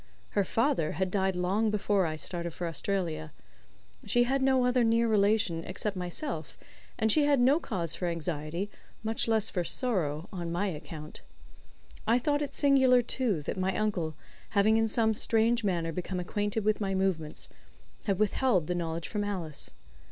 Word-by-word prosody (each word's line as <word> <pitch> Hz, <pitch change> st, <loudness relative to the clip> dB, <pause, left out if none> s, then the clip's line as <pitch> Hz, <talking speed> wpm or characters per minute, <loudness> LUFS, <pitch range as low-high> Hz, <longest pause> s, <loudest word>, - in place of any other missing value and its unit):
Her 200 Hz, -, +1 dB
father 225 Hz, -, +1 dB
had 185 Hz, +3 st, -1 dB
died 190 Hz, -1 st, +1 dB
long 195 Hz, +5 st, +1 dB
before 205 Hz, -3 st, +1 dB
I 155 Hz, -, -3 dB
started 170 Hz, +1 st, -4 dB
for 175 Hz, -, -3 dB
Australia. 165 Hz, -, -2 dB, 0.7 s
She 240 Hz, -, +3 dB
had 265 Hz, +3 st, 0 dB
no 265 Hz, -1 st, +3 dB
other 250 Hz, 0 st, +3 dB
near 230 Hz, +1 st, +3 dB
relation 205 Hz, -5 st, +2 dB
except 195 Hz, +3 st, -3 dB
myself, 180 Hz, -, -5 dB, 0.4 s
and 220 Hz, 0 st, +2 dB
she 295 Hz, +6 st, +4 dB
had 285 Hz, -2 st, +4 dB
no 265 Hz, +6 st, +5 dB
cause 180 Hz, -, -3 dB
for 180 Hz, -, -2 dB
anxiety, 170 Hz, +3 st, -3 dB, 0.3 s
much 225 Hz, +1 st, -1 dB
less 220 Hz, -1 st, +2 dB
for 180 Hz, -, -1 dB
"sorrow," 170 Hz, -, -1 dB
on 170 Hz, -3 st, -4 dB
my 175 Hz, +4 st, 0 dB
account. 155 Hz, -1 st, -8 dB, 0.9 s
I 230 Hz, +2 st, +5 dB
thought 290 Hz, +4 st, +1 dB
it 290 Hz, -, -3 dB
singular, 265 Hz, -3 st, +5 dB
too, 225 Hz, -, 0 dB
that 185 Hz, -, -4 dB
my 185 Hz, 0 st, 0 dB
uncle, 180 Hz, -8 st, -1 dB, 0.4 s
having 215 Hz, +2 st, +5 dB
in 225 Hz, 0 st, +3 dB
some 220 Hz, 0 st, +2 dB
strange 230 Hz, +2 st, +2 dB
manner 170 Hz, -5 st, 0 dB
become 180 Hz, +2 st, -3 dB
acquainted 205 Hz, +4 st, -2 dB
with 215 Hz, 0 st, +2 dB
my 195 Hz, -1 st, 0 dB
movements, 160 Hz, -, -1 dB, 0.6 s
had 195 Hz, -, +1 dB
withheld 215 Hz, -, +2 dB
the 180 Hz, -, -1 dB
knowledge 165 Hz, -1 st, -3 dB
from 210 Hz, -2 st, -2 dB
Alice. 175 Hz, -8 st, -4 dB
200 Hz, 165 wpm, -29 LUFS, 170-225 Hz, 0.9 s, no